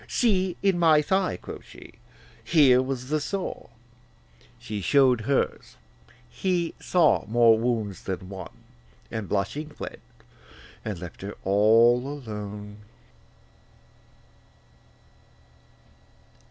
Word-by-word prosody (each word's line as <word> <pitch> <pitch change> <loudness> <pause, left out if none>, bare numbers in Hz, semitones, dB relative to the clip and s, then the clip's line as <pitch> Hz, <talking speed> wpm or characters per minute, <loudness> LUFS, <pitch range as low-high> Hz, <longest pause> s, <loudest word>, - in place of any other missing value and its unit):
See, 190 -7 +1
in 195 -3 +2
my 155 -3 +5
thigh,' 190 - 0
quoth - - -9
she, - - -14 0.5
'here 135 -6 +5
was 130 -1 -4
the 155 +1 +1
sore. 190 0 -5 0.9
She 105 -1 -6
showed 130 +2 +4
hers: 135 +4 -2 0.5
he 175 +2 -1
saw 170 - +2
more 115 0 +5
wounds 110 -4 -2
than 95 -1 -5
one, 95 -1 -8 0.6
And 110 -3 -5
blushing 105 +10 -2
fled, 150 - -9 0.8
and 105 -4 -4
left 85 -1 -10
her 100 +1 -6
all 110 +5 +5
alone. 105 -6 -7
125 Hz, 100 wpm, -26 LUFS, 105-155 Hz, 0.9 s, my